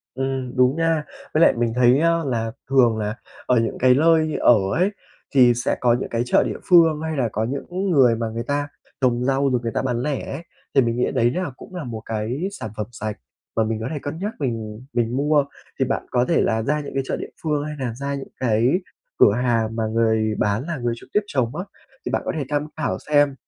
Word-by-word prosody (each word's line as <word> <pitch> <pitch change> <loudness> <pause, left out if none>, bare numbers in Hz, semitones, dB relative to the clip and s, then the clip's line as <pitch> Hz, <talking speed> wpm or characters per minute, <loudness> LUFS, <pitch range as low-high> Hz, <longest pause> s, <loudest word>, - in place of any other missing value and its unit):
Ừm, 135 -1 -3
đúng 125 +2 +4
nha. 165 -2 +1 0.3
Với 155 - +3
lại - - +7
mình 120 -1 +1
thấy, 125 +1 +5
a, 165 0 +2
là 115 -4 -2 0.2
thường 125 -4 +4
là 105 0 -2 0.3
ở 125 - +3
những 115 - -2
cái 130 0 +5
lơi 155 +2 +3
ở 120 - +7 0.2
ấy 185 +5 +2 0.4
thì 125 -3 +6
sẽ 120 - -1
có 120 -1 +4
những - - -4
cái 115 0 0
chợ - - +4
địa - - -3
phương 165 -4 +6
hay 160 -1 -3
là 125 -4 +1
có 110 - -1
những 175 - -3
người 130 -8 +5
mà 115 0 -2
người 115 +1 -4
ta 145 +1 -1 0.3
trồng 125 -2 +2
rau 135 +1 +2
rồi 125 -2 +1
người 115 -1 -3
ta - - 0
bán 125 -2 -1
lẻ 145 -1 -3
ấy, 140 +4 -5 0.3
thì 140 - +6
mình 115 -1 0
nghĩ 125 - +1
đấy 120 -2 +3
là 180 +4 -2
cũng 185 - -13
là 175 -4 -4
một 115 -3 -6
cái 115 - -2
sản 110 - -7
phẩm 105 - -3
sạch 110 -2 -4 0.4
mà 110 - +3
mình 110 0 -2
có 110 - -3
thể 150 - -2
cân 145 +3 -5
nhắc 205 +4 -3
mình 115 -3 -4
mình 120 0 0
mua 145 +1 +3 0.3
thì 135 - +3
bạn 135 +1 -2
có 125 -1 +2
thể 170 - +3
là 110 -1 +1
ra 150 +6 0
những 145 - -7
cái 135 - +1
chợ - - -1
địa - - -7
phương 150 -2 0
hay 150 0 -5
nà 125 -4 -3
ra 140 +3 -3
những 135 -1 -6
cái 115 -1 +2 0.5
cửa - - +7
hàng 115 -3 0
mà 115 - 0
người 110 -1 +2
bán 105 +4 0
là 170 -3 -3
người 120 -1 -1
trực - - -14
tiếp 210 - +4
trồng 130 - -1
á. 180 - -3 0.4
Thì - - -1
bạn - - 0
có - - -1
thể 145 - -1
tham 145 0 -1
khảo 155 - -1
xem, 145 -2 +4
130 Hz, 245 wpm, -22 LUFS, 115-150 Hz, 0.5 s, lại